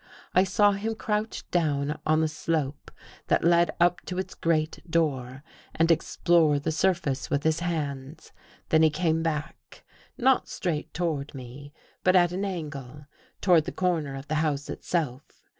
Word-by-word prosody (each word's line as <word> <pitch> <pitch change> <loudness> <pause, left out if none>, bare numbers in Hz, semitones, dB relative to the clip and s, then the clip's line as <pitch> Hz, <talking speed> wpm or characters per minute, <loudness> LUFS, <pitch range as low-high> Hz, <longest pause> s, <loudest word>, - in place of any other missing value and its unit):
I 185 - +5
saw 205 +2 +4
him 215 +3 -2
crouch 215 0 -3
down 150 -3 0
on 155 0 +3
the 160 - +2
slope 150 -2 -3 0.4
that - - +2
led 170 0 +4
up 175 +1 +3
to 180 - -4
its 185 0 -3
great 155 -1 0
door 135 -5 -1 0.3
and 165 +1 +3
explore 165 -1 +3
the 145 +3 -2
surface 160 -5 0
with 140 - 0
his 160 0 +2
hands. 150 -4 -4 0.4
Then 160 - +4
he 160 - +6
came 160 +1 0
back 160 0 -5 0.2
— - - -26
not 265 0 +3
straight 165 -6 -3
toward 155 -5 -3
me, 130 +3 -10 0.3
but 185 0 +4
at 175 -1 +5
an 190 +3 -2
angle, 150 -6 -6 0.4
toward 175 -5 +4
the - - -4
corner 165 -7 -1
of 135 +2 -8
the 155 - -3
house 145 -2 -1
itself. 145 -7 -4
160 Hz, 160 wpm, -27 LUFS, 145-175 Hz, 0.4 s, he